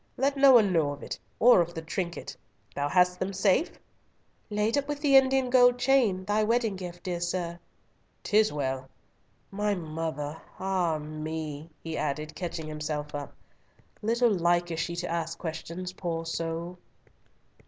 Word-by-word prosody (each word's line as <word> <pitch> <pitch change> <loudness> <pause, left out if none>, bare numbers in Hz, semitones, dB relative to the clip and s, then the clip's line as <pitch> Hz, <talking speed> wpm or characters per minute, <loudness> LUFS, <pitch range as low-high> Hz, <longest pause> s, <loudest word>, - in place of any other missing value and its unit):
Let 275 +2 +1
no 275 0 +7
one 210 -6 +6
know 150 -4 +2
of 145 - -11
it, - - -5 0.2
or 240 -6 +7
of 170 0 -3
the 160 - -4
trinket—Thou 170 -4 -5
hast 180 +2 +3
them 190 +1 -2
safe?" 195 - +2 0.7
"Laid 210 +3 +1
up 285 -1 0
with 295 -1 -3
the 285 -2 +3
Indian 265 -1 +4
gold 245 -1 +6
chain, 245 -7 +2
thy 210 +2 +2
wedding 225 -1 +1
gift, 175 -2 -8
dear 175 -2 -2
sir." 175 -1 -2 0.6
"'Tis 215 +1 +3
well. 135 -2 -3 0.6
My 205 +1 0
mother!—ah 160 +2 -3
me," 155 0 -5
he 160 -1 -4
added, 150 +1 -2
catching 170 -3 -4
himself 150 -1 -4
up; 145 -1 -6 0.7
"little 235 +2 +2
like 175 -2 +2
is 165 - -3
she 170 +1 -2
to 175 +1 -3
ask 165 -1 -3
questions, 170 +2 -5
poor 165 -3 -3
soul." 165 +2 -4
175 Hz, 150 wpm, -28 LUFS, 160-210 Hz, 0.7 s, no